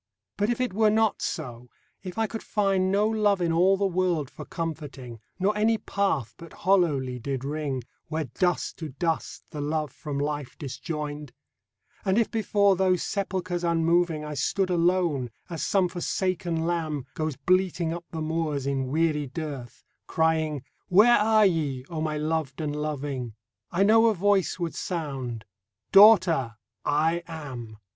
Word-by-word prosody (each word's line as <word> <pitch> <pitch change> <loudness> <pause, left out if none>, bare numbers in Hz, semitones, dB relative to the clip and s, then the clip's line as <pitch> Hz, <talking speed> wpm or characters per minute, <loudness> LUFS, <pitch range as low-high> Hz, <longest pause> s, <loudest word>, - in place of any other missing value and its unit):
But 205 +1 0
if 240 - 0
it 255 -5 -1
were 215 +1 +4
not 220 0 +2
so, 125 -5 -5 0.2
— - - -43
if 185 0 -7
I 225 - +2
could 220 +1 -5
find 195 -3 +1
No 205 +2 +3
love 210 -3 +2
in 170 -2 +1
all 185 +4 +4
the 200 - +1
world 175 -6 0
for - - -9
comforting, 145 -8 -6 0.2
Nor 195 +3 +1
any 220 +2 +3
path 195 - -1
but 165 -1 -11
hollowly 145 -10 +2
did 135 +1 -4
ring, 145 -3 -3 0.2
Where 160 0 -2
"dust 175 +7 -1
to 160 -2 -5
dust"the 155 0 -3
love 150 -1 -1
from 145 -1 -6
life 145 -1 -3
disjoined 150 -1 -5 0.7
And 190 0 +1
if 230 - +2
before 205 -3 +3
those 185 -1 +2
sepulchres 185 -3 -2
unmoving 170 -1 +2
I 150 - -5
stood 185 +6 0
alone 170 -7 +1 0.2
(as 165 - -4
some 190 -2 +2
forsaken 175 -1 -2
lamb 160 -5 -2
Goes 155 -2 -2
bleating 180 +1 +1
up 170 0 -7
the 160 - -5
moors 155 -3 -1
in 135 -1 -1
weary 150 0 +1
dearth), 135 -4 -7 0.2
Crying, 160 -3 +1
" - - -46
Where 215 +6 +6
are 215 0 +4
ye, 145 -8 0
O 160 -2 -3
my 155 -1 -1
loved 155 -2 -2
and 150 -2 -2
loving?" 140 -6 -3 0.3
I 185 +3 +2
know 225 +3 +6
a 220 - +3
Voice 195 0 +2
would 170 -2 -3
sound, 135 - -4 0.2
" 100 0 -62
Daughter, 175 - +6 0.3
I 160 +4 +1
AM. 130 -9 -7
165 Hz, 160 wpm, -26 LUFS, 145-190 Hz, 0.7 s, Where